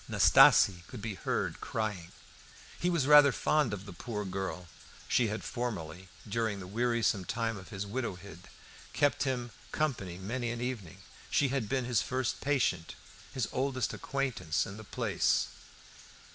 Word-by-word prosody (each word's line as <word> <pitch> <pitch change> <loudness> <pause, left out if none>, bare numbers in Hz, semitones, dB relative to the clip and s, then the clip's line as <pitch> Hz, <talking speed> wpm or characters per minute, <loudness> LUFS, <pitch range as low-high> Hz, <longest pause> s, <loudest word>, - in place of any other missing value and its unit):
Nastasie 90 -3 +6
could 125 - -8
be 110 0 -4
heard - - -2
crying. 105 -6 -3 0.7
He 175 - +1
was 170 -6 +1
rather 145 -1 +8
fond 150 -2 +1
of 100 -1 -5
the 100 - -9
poor 105 +2 -5
girl. 95 -1 -4 0.4
She 120 - +3
had 105 +1 -4
formerly, 95 -7 -4 0.2
during 110 -1 -1
the 95 - -7
wearisome 115 0 +1
time 115 +3 -2
of 95 -2 -10
his 100 -2 -4
widowhood, 100 -5 -5 0.5
kept 145 -1 +2
him 125 -3 -2 0.2
company 115 - -2
many 120 +6 -3
an 120 0 -3
evening. 120 -9 -5 0.3
She 140 - +2
had 125 -6 -1
been 130 -2 0
his 120 -3 +2
first 130 -1 -2
patient, 135 - 0 0.4
his 125 -5 -1
oldest 130 -2 -1
acquaintance 125 - -1
in 100 - -8
the 110 - -9
place. - - +1
115 Hz, 150 wpm, -31 LUFS, 95-130 Hz, 0.7 s, rather